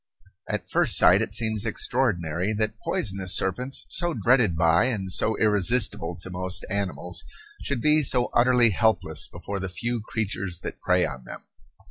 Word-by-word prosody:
At - - -3
first - - +2
sight - - +5
it - - -3
seems 110 -2 -1
extraordinary 105 -6 -1
that 110 0 -3
poisonous 95 -2 +1
serpents, 125 +8 -1
so 175 -2 +1
dreaded 115 -5 +2
by 85 +1 +3
and 100 -7 -2
so 110 - +1
irresistible 105 -4 +2
to 95 - -8
most 90 0 -3
animals, 90 -4 -4 0.4
should 135 -4 -3
be 155 +2 +4
so 125 -3 +1
utterly 120 -1 +4
helpless 110 +3 0
before 100 0 -7
the 95 0 -5
few 120 +5 -3
creatures 100 -5 -4
that - - -7
prey 90 -1 +2
on 65 -4 -7
them. - - -10
105 Hz, 155 wpm, -24 LUFS, 90-120 Hz, 0.4 s, sight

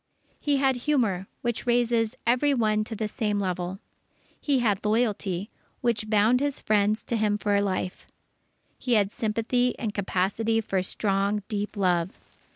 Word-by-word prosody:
He 290 -1 +1
had 270 -2 +2
humour, 210 -11 +1 0.2
which 240 0 -2
raises 235 -1 +2
every 255 +5 +3
one 215 -3 +2
to 225 - -6
the 215 0 -2
same 210 -1 -1
level. 185 -1 -2 0.6
He 285 -2 +1
had 210 -6 +1
loyalty, 210 -3 0 0.3
which 215 -3 0
bound 215 +4 +4
his 285 0 -1
friends 210 0 +1
to 235 - -2
him 210 -2 +1
for 205 -1 +1
life. 185 -2 -3 0.7
He 250 - 0
had 205 -3 +3
sympathy 240 +2 0
and 220 -4 -3
capacity 205 +3 0
for 195 -4 -1
strong, 200 +2 0
deep 210 0 -3
love. 180 -2 0
215 Hz, 150 wpm, -26 LUFS, 200-240 Hz, 0.7 s, bound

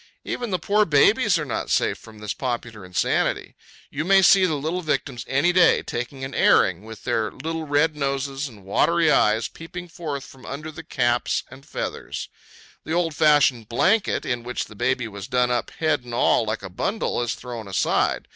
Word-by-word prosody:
Even 240 -2 -4
the 185 - 0
poor 205 +5 +2
babies 205 - +4
are 155 - -3
not 130 - -3
safe - - +2
from 110 -1 -15
this 105 -1 -4
popular 120 -5 -4
insanity. 90 0 -1 0.4
You 150 - -2
may 195 +2 +5
see 190 0 +6
the 160 - 0
little 160 +6 -2
victims 140 -6 -2
any 140 +7 +2
day, 180 -1 +5
taking 125 +3 -5
an 135 0 -5
airing, 95 +1 +3
with 110 -2 -10
their 115 -3 0
little 160 +2 -5
red 150 +2 +2
noses 140 0 -2
and 105 -6 -14
watery 165 - +3
eyes 110 -2 +3
peeping 175 +2 -9
forth 150 -5 -5
from 130 -2 -15
under 150 +3 -6
the 160 - -9
cap 120 -5 0 0.2
and 130 +1 -12
feathers. - - -5 0.5
The 160 - -4
old 170 -2 +1
fashioned 145 -7 +3
blanket, 190 - +2
in 120 -1 -1
which 125 +1 -4
the 105 - -14
baby 125 +2 0
was 100 -1 -8
done 125 -1 +1
up 120 - -1
head 155 -5 0
and 120 -1 -6
all, 120 - +3
like 110 -1 -3
a 95 - -6
bundle, 195 - -1
is 120 -1 -1
thrown 120 -4 -8
aside. 95 - 0
135 Hz, 190 wpm, -23 LUFS, 120-165 Hz, 0.5 s, see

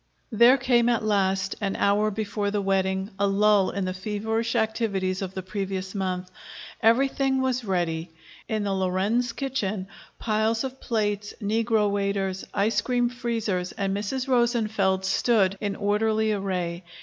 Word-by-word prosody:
There 235 +4 +6
came, 245 -2 +3
at 235 -2 +1
last, 195 -2 +1
an 195 -1 -1
hour 205 +1 +2
before 210 -1 -2
the 205 0 -1
wedding, 190 0 0
a 200 - +3
lull 200 0 +3
in 200 -1 -2
the 185 - -2
feverish 220 +4 -2
activities 215 -5 0
of 190 -1 -5
the 190 - -4
previous 190 -1 -4
month. 185 -2 -3 0.5
Everything 265 +3 +3
was 255 -1 0
ready. 175 -4 -1 0.4
In 215 -1 -1
the 200 -1 -1
Lorenz 195 +6 0
kitchen, 215 -7 -3 0.3
piles 220 +1 0
of 265 0 -6
plates, 210 -2 -1
negro 220 0 +1
waiters, 200 -1 -1
ice 210 +2 +1
cream 245 -1 +1
freezers, 225 -7 -2
and 195 -1 -1
Mrs. 250 +6 -3
Rosenfeld 220 -6 +1
stood 195 -1 +2
in 205 -2 -2
orderly 215 +1 +1
array. 185 -4 -2
205 Hz, 145 wpm, -25 LUFS, 190-230 Hz, 0.5 s, There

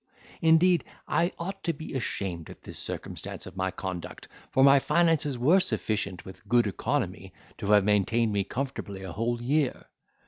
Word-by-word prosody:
Indeed, 165 +2 +5 0.2
I 170 +1 +2
ought 190 +3 -5
to 170 - 0
be 155 +1 -8
ashamed 95 - -3
at - - -12
this - - -7
circumstance - - -6
of - - -10
my 95 0 0
conduct; 95 -2 -6 0.2
for 130 - +3
my 140 0 +8
finances 160 -3 +2
were 155 +11 +5
sufficient, 100 - -2
with 95 +3 -12
good 120 0 +4
economy, 100 - -2 0.3
to - - -4
have 105 -1 +6
maintained 105 +2 +2
me 100 -1 +1
comfortably 105 -4 -5
a 95 - -6
whole 115 +6 -1
year. 140 +2 0
120 Hz, 165 wpm, -28 LUFS, 100-155 Hz, 0.3 s, my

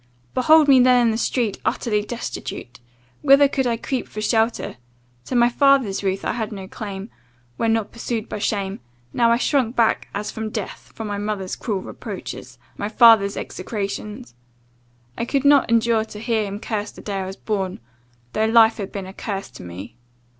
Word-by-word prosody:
"Behold 310 +3 +5
me 270 -2 +7
then 250 0 +6
in 230 - +3
the - - -1
street, 235 -3 -1
utterly 210 -3 0
destitute! 205 - -6 0.4
Whither 275 +1 +6
could 265 -2 0
I 230 -1 0
creep 255 +2 -3
for 215 - -8
shelter? 225 - 0 0.5
To 260 - -4
my 240 0 +5
father's 255 -6 +3
roof 195 0 -1
I - - +1
had 220 -3 -3
no 195 -3 -7
claim, 200 +1 -7 0.5
when 225 - +1
not 225 -2 0
pursued 230 -1 -4
by - - -5
shame 200 -2 -2 0.3
now 235 -1 +3
I 235 - +4
shrunk 250 -2 +1
back 230 -2 +2
as 210 +1 -3
from 220 0 -4
death, 215 -2 -6
from 225 - -5
my 205 -1 -3
mother's 205 -3 -3
cruel 200 -5 -3
reproaches, - - -8 0.2
my 205 - -2
father's 220 -3 +6
execrations. 210 - -5 0.9
I - - 0
could 275 +2 -1
not 285 -3 +5
endure 230 -1 +3
to 210 - -10
hear 225 -1 0
him 200 +1 -5
curse 210 -1 -3
the - - -12
day 200 -2 -3
I 190 - -3
was 190 - -6
born, 195 -4 -3 0.5
though 215 - +1
life 225 0 +5
had 200 -3 -5
been 195 -2 -5
a 190 - -9
curse 195 -1 -5
to - - -11
me. 90 +6 -9
220 Hz, 185 wpm, -22 LUFS, 200-235 Hz, 0.9 s, me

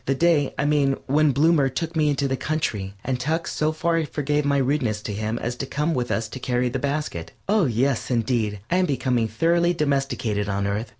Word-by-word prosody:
The 135 - +2
day, 155 -2 +3
I 140 - 0
mean, 145 -2 +2
when 150 +2 +3
Bloomer 145 0 +3
took 165 +6 -4
me 155 -1 +3
into 140 -1 0
the 135 - 0
country, 105 -11 -2
and 130 -2 -1
Tuck 160 +6 -1
so 155 +1 0
far 165 +1 0
forgave 150 0 -1
my 140 0 +2
rudeness 130 -5 0
to 105 - -4
him 110 +2 -2
as 120 +1 -3
to 135 - -4
come 150 +4 -1
with 125 -3 -1
us 115 0 -1
to 130 - -7
carry 125 0 0
the 130 +2 -3
basket. 140 - -3
Oh, 205 -2 +3
yes, 125 +1 0
indeed, 115 -4 0
I 180 - +3
am 185 -1 +2
becoming 125 -5 0
thoroughly 170 +9 +2
domesticated 135 -9 -1
on 100 0 -1
Earth. 105 +3 -2
135 Hz, 215 wpm, -24 LUFS, 120-155 Hz, -, day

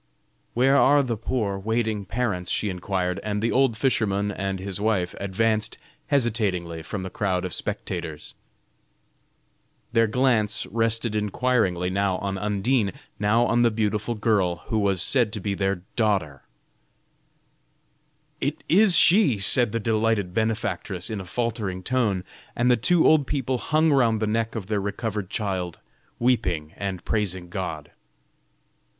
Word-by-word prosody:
"Where 135 +3 +4
are 145 +1 +5
the 120 -3 -2
poor 105 -3 -2
waiting 110 0 -1
parents?" 100 -4 -2
she 105 - 0
inquired, 90 0 -2
and, 105 -1 -2
the 115 +2 0
old 130 -4 +2
fisherman 105 -5 +1
and 95 -1 -3
his 95 +1 -5
wife 100 -5 0
advanced 105 +2 0 0.3
hesitatingly 100 - 0
from 95 +5 -5
the 95 - -6
crowd 95 -3 -1
of 90 - -4
spectators. 90 -6 -4 1.6
Their 115 0 +4
glance 110 -3 +2
rested 115 0 0
inquiringly 105 -4 0
now 95 -1 0
on 100 0 -3
Undine, 105 +1 0 0.3
now 110 +4 +3
on 120 0 +2
the 120 - +5
beautiful 110 +1 -1
girl 105 -5 +1
who 110 - +1
was 95 -3 +1
said 120 -3 +3
to 105 - -2
be 100 +1 -2
their 95 -2 -1
daughter 95 - 0 2.0
"It - - -2
is 190 0 +6
she," 180 - +5
said 110 +4 +3
the 115 - -1
delighted 110 -3 0
benefactress, 110 -3 -2
in 105 -3 -3
a - - -9
faltering 105 -3 -3
tone, 110 -7 0 0.3
and 125 +1 +3
the - - +6
two 165 +9 +2
old 150 -4 +4
people 130 -3 -1
hung 155 +3 +2
round 115 -5 +3
the 110 - 0
neck 115 +2 -1
of 110 -4 -4
their 105 0 -1
recovered 100 -1 -3
child, 95 -5 -3 0.4
weeping 90 -11 0
and 95 -3 -5
praising 95 -5 -2
God. 85 -5 -5
105 Hz, 145 wpm, -24 LUFS, 95-115 Hz, 2.0 s, is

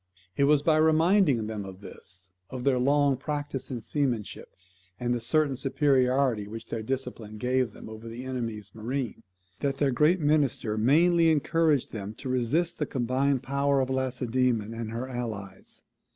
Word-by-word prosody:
It 140 - +3
was 145 0 +4
by 155 -1 +4
reminding 160 - +4
them 105 -2 -4
of 95 -1 -9
this, 95 -1 -5 0.2
of 130 -1 -6
their 130 -2 +2
long 140 +1 +3
practice 145 -1 -4
in 125 -4 -4
seamanship, 125 -4 -2 0.5
and 120 0 0
the 120 - -2
certain 140 +3 +2
superiority 130 -4 +2
which 115 +2 -8
their 115 - -3
discipline 120 -3 -5
gave 125 0 0
them - - -11
over 110 +1 -9
the 120 +2 -7
enemy's 115 -6 -4
marine, 120 +2 -4 0.4
that 135 -1 -1
their 140 -1 +2
great 150 +9 +3
minister 145 -8 +1
mainly 165 +9 +4
encouraged 155 -1 +2
them 105 -1 -6
to 130 - -7
resist 130 +8 0
the 150 - -1
combined 130 +1 0
power 140 +1 +1
of 130 0 0
Lacedaemon 125 -3 0
and 115 -1 -5
her 115 +3 -4
allies. 110 -7 -6
130 Hz, 160 wpm, -27 LUFS, 115-145 Hz, 0.5 s, was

